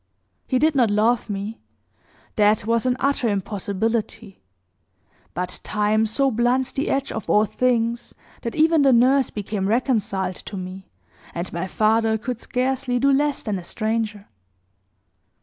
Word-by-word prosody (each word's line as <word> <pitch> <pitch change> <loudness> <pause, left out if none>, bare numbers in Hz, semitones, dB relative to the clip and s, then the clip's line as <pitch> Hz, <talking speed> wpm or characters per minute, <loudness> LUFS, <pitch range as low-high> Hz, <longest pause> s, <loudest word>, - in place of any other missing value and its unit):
He 255 - +1
did 310 +4 +3
not 250 -6 +3
love 220 +3 +2
me 205 +3 -4 0.8
that 210 0 +3
was 230 +2 +1
an 250 0 +1
utter 275 -4 +1
impossibility; 205 +1 -2 0.9
but 180 +1 -3
time 215 +1 +1
so 270 +5 +1
blunts 245 +3 +1
the 275 - -2
edge 275 0 -1
of 220 - -6
all 210 +1 +4
things, 235 0 -1 0.3
that 230 - -4
even 320 0 +4
the 270 -2 +5
nurse 260 +3 +4
became 205 -1 -3
reconciled 210 -5 0
to 200 - -8
me, 185 +1 -8 0.5
and 170 +2 -4
my 170 +3 -3
father 220 +2 +2
could 235 +2 -5
scarcely 255 0 -1
do 275 +3 +3
less 290 +1 +1
than 205 -4 -2
a - - -10
stranger. 215 +1 -2
225 Hz, 145 wpm, -22 LUFS, 205-255 Hz, 0.9 s, the